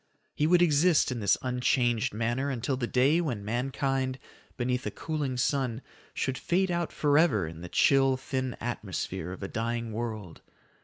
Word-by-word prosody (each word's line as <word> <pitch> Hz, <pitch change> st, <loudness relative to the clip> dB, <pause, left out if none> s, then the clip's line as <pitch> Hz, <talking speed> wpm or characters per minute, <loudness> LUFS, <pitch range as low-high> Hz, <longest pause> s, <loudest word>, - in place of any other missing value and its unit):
He 150 Hz, -, +1 dB
would 175 Hz, +1 st, +5 dB
exist 160 Hz, -1 st, +4 dB
in 125 Hz, -, -3 dB
this 100 Hz, -2 st, +3 dB
unchanged 125 Hz, -1 st, +1 dB
manner 120 Hz, +6 st, -1 dB
until 130 Hz, 0 st, -1 dB
that 120 Hz, -2 st, -3 dB
day 140 Hz, +7 st, +4 dB
when 120 Hz, -11 st, -3 dB
mankind, 130 Hz, +3 st, -1 dB, 0.4 s
beneath 125 Hz, 0 st, -1 dB
a -, -, 0 dB
cooling 145 Hz, -5 st, -3 dB
sun, 130 Hz, -2 st, 0 dB, 0.3 s
should 130 Hz, -1 st, -2 dB
fade 185 Hz, +1 st, +1 dB
out 170 Hz, -1 st, -1 dB
forever 145 Hz, -, +3 dB
in 80 Hz, +1 st, -8 dB
the 90 Hz, -, -7 dB
chill, 135 Hz, +3 st, +4 dB
thin 130 Hz, -1 st, -3 dB
atmosphere 95 Hz, -6 st, -4 dB
of 95 Hz, -, -8 dB
a -, -, -2 dB
dying 115 Hz, +2 st, -3 dB
world. 110 Hz, -6 st, -5 dB
130 Hz, 160 wpm, -28 LUFS, 115-140 Hz, 0.4 s, would